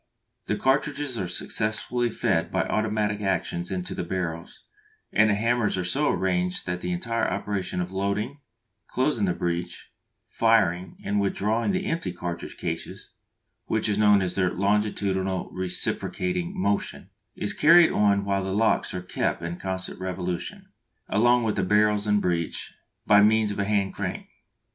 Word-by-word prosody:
The -, -, +1 dB
cartridges 140 Hz, -1 st, 0 dB
are 95 Hz, -, -2 dB
successively 110 Hz, +6 st, 0 dB
fed -, -, 0 dB
by -, -, +1 dB
automatic 105 Hz, -1 st, -1 dB
actions 90 Hz, -3 st, -1 dB
into 90 Hz, -1 st, -3 dB
the -, -, -3 dB
barrels, 85 Hz, -2 st, -4 dB, 0.5 s
and 110 Hz, 0 st, +5 dB
the 100 Hz, -, +3 dB
hammers 115 Hz, -1 st, +1 dB
are 90 Hz, -, -1 dB
so 145 Hz, +11 st, +1 dB
arranged 90 Hz, -1 st, 0 dB
that 90 Hz, 0 st, -3 dB
the 90 Hz, -, -3 dB
entire 115 Hz, +6 st, -1 dB
operation 100 Hz, -1 st, -2 dB
of 90 Hz, +1 st, -3 dB
loading, 100 Hz, +8 st, -2 dB, 0.5 s
closing 130 Hz, -5 st, +1 dB
the 90 Hz, -2 st, 0 dB
breech, 85 Hz, 0 st, -4 dB, 0.3 s
firing 95 Hz, -6 st, +1 dB
and 100 Hz, 0 st, +1 dB
withdrawing 105 Hz, -, 0 dB
the 190 Hz, 0 st, -1 dB
empty 165 Hz, -, -2 dB
cartridge 85 Hz, -1 st, -6 dB
cases -, -, -5 dB, 0.6 s
(which 110 Hz, 0 st, 0 dB
is 105 Hz, -1 st, 0 dB
known 105 Hz, -2 st, +5 dB
as 90 Hz, -1 st, -2 dB
their 90 Hz, -1 st, +1 dB
"longitudinal 100 Hz, -1 st, 0 dB
reciprocating 90 Hz, -1 st, -2 dB
motion") 100 Hz, +2 st, -1 dB, 0.2 s
is 105 Hz, -, -1 dB
carried 170 Hz, +2 st, +6 dB
on 100 Hz, -1 st, +2 dB
while 100 Hz, -1 st, 0 dB
the 95 Hz, 0 st, -2 dB
locks 110 Hz, -2 st, +1 dB
are 90 Hz, -, -4 dB
kept 90 Hz, -, -2 dB
in 85 Hz, +1 st, -4 dB
constant 95 Hz, -1 st, -4 dB
revolution, 90 Hz, -1 st, -4 dB, 0.4 s
along 120 Hz, +3 st, +4 dB
with 110 Hz, -2 st, 0 dB
the -, -, 0 dB
barrels 105 Hz, +1 st, +2 dB
and 105 Hz, 0 st, +2 dB
breech, 85 Hz, -2 st, -2 dB, 0.3 s
by 105 Hz, 0 st, +6 dB
means 110 Hz, 0 st, +4 dB
of 100 Hz, -, -5 dB
a 100 Hz, -, +1 dB
hand 100 Hz, -2 st, 0 dB
crank. -, -, -4 dB
100 Hz, 155 wpm, -26 LUFS, 90-110 Hz, 0.6 s, carried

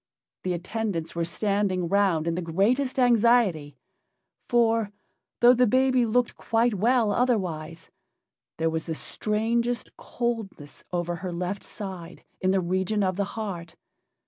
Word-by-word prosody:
The 185 Hz, -, -1 dB
attendants 185 Hz, -1 st, -3 dB
were 170 Hz, -, 0 dB
standing 195 Hz, 0 st, 0 dB
round 190 Hz, -4 st, +2 dB
in 170 Hz, -, 0 dB
the 180 Hz, -, -2 dB
greatest 215 Hz, -, +1 dB
anxiety, 230 Hz, -, +3 dB, 0.7 s
for, 230 Hz, -3 st, +2 dB, 0.5 s
though 240 Hz, +1 st, +8 dB
the 250 Hz, 0 st, +3 dB
baby 255 Hz, +1 st, +3 dB
looked 240 Hz, +2 st, +1 dB
quite 230 Hz, 0 st, +1 dB
well 225 Hz, +2 st, +2 dB
otherwise, 180 Hz, -9 st, -1 dB, 0.7 s
there 160 Hz, 0 st, 0 dB
was 160 Hz, 0 st, -3 dB
the 160 Hz, -, -2 dB
strangest 230 Hz, +6 st, -1 dB
coldness 225 Hz, -11 st, -5 dB
over 175 Hz, -1 st, -2 dB
her 185 Hz, 0 st, -5 dB
left 180 Hz, +3 st, -3 dB
side, 185 Hz, -5 st, -8 dB, 0.2 s
in 185 Hz, -, +1 dB
the 190 Hz, 0 st, +2 dB
region 190 Hz, +4 st, 0 dB
of 185 Hz, -1 st, 0 dB
the 200 Hz, +1 st, 0 dB
heart. 175 Hz, -7 st, -5 dB
200 Hz, 135 wpm, -26 LUFS, 175-235 Hz, 0.7 s, though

